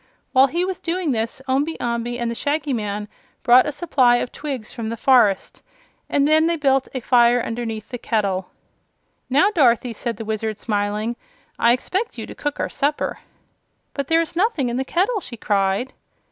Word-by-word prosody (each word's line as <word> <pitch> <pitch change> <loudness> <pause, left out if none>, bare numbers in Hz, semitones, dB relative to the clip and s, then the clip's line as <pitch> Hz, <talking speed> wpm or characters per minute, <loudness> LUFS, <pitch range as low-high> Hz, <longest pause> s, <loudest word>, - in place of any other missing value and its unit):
While 265 0 +6
he 345 +6 -1
was 375 -1 -4
doing 340 -2 -1
this 230 +3 -2
Omby 285 +5 0
Amby 240 0 -2
and 235 -1 -2
the - - -2
Shaggy 285 +3 -1
Man 210 -2 -3 0.4
brought 250 +3 +6
a - - -1
supply 280 -5 +3
of 240 - -2
twigs 270 -7 -6
from 230 -3 -4
the 230 - -4
forest 220 -7 +3 0.5
and 285 0 +2
then 315 +1 +4
they 340 - +1
built 270 -4 +2
a 260 - -2
fire 240 0 +4
underneath 225 -2 -4
the 245 - -6
kettle. 195 -6 -1 0.8
"Now, 295 +11 +4
Dorothy," 245 - +3
said 230 0 -4
the 225 - -6
Wizard, 220 0 -3
smiling, 210 +2 -2 0.4
"I 235 - +5
expect 375 - -1
you - - -5
to - - -9
cook 290 -1 -4
our - - 0
supper." 290 +2 -1 0.7
"But 280 -2 -3
there 325 +2 +4
is 330 - -5
nothing 350 - +1
in 240 - -2
the 265 - 0
kettle," 400 - +1
she 240 -7 -9
cried. 200 +4 0
250 Hz, 185 wpm, -21 LUFS, 225-295 Hz, 0.8 s, While